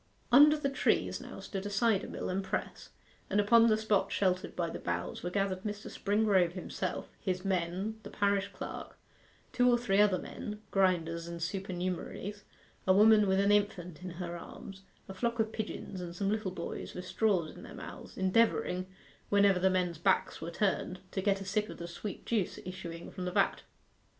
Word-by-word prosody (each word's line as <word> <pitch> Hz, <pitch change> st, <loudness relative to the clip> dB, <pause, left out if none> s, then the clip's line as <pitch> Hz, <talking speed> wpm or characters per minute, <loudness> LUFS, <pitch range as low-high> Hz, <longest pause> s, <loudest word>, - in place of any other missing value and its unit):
Under 295 Hz, +4 st, +8 dB
the 295 Hz, -, -1 dB
trees -, -, +1 dB
now -, -, -9 dB
stood 195 Hz, -2 st, -5 dB
a -, -, -3 dB
cider 210 Hz, 0 st, +2 dB
mill -, -, -5 dB
and 190 Hz, +1 st, -1 dB
press, 190 Hz, +2 st, -4 dB, 0.4 s
and 200 Hz, -, +2 dB
upon 230 Hz, +3 st, +6 dB
the 215 Hz, -1 st, +4 dB
spot 215 Hz, -2 st, +1 dB
sheltered 185 Hz, -2 st, 0 dB
by 170 Hz, -1 st, 0 dB
the 165 Hz, -, -5 dB
boughs 85 Hz, 0 st, -3 dB
were 175 Hz, -, -2 dB
gathered 195 Hz, 0 st, -1 dB
Mr. 205 Hz, 0 st, -5 dB
Springrove 200 Hz, -4 st, +2 dB
himself, 185 Hz, -, -4 dB
his 185 Hz, -1 st, -2 dB
men, 190 Hz, +4 st, -1 dB
the 205 Hz, -, -9 dB
parish 200 Hz, -1 st, +1 dB
clerk, -, -, -7 dB, 0.6 s
two 250 Hz, 0 st, +4 dB
or 240 Hz, -, +5 dB
three 205 Hz, -4 st, +3 dB
other 205 Hz, -3 st, +4 dB
men, 210 Hz, +3 st, -6 dB
grinders 170 Hz, -3 st, +1 dB
and 170 Hz, 0 st, -6 dB
supernumeraries, 185 Hz, +2 st, -3 dB, 0.5 s
a 185 Hz, -, +7 dB
woman 210 Hz, +1 st, +6 dB
with 190 Hz, 0 st, +3 dB
an 200 Hz, +1 st, +4 dB
infant 185 Hz, -5 st, 0 dB
in 180 Hz, -, -5 dB
her 175 Hz, -1 st, -4 dB
arms, 190 Hz, +2 st, -9 dB, 0.3 s
a 195 Hz, -, -7 dB
flock 235 Hz, +4 st, -1 dB
of 220 Hz, 0 st, +1 dB
pigeons, 210 Hz, -4 st, -5 dB
and 170 Hz, -1 st, -6 dB
some 195 Hz, +2 st, 0 dB
little 215 Hz, -2 st, -1 dB
boys 175 Hz, -2 st, -6 dB
with 180 Hz, -, -6 dB
straws 185 Hz, -6 st, +1 dB
in -, -, -11 dB
their -, -, -10 dB
mouths, -, -, -9 dB
endeavouring, 190 Hz, -2 st, +2 dB, 0.4 s
whenever 200 Hz, -2 st, +5 dB
the 190 Hz, +1 st, +4 dB
men's 180 Hz, -3 st, 0 dB
backs 190 Hz, +2 st, +1 dB
were 165 Hz, -, -4 dB
turned, 185 Hz, 0 st, -1 dB
to 190 Hz, -, -2 dB
get 195 Hz, 0 st, +1 dB
a -, -, -6 dB
sip 210 Hz, +2 st, 0 dB
of -, -, -8 dB
the 170 Hz, -, -6 dB
sweet 190 Hz, +4 st, -7 dB
juice 215 Hz, -6 st, 0 dB
issuing 175 Hz, -2 st, -7 dB
from 185 Hz, -1 st, -5 dB
the 180 Hz, -, -2 dB
vat. -, -, +2 dB
195 Hz, 190 wpm, -32 LUFS, 180-210 Hz, 0.6 s, Under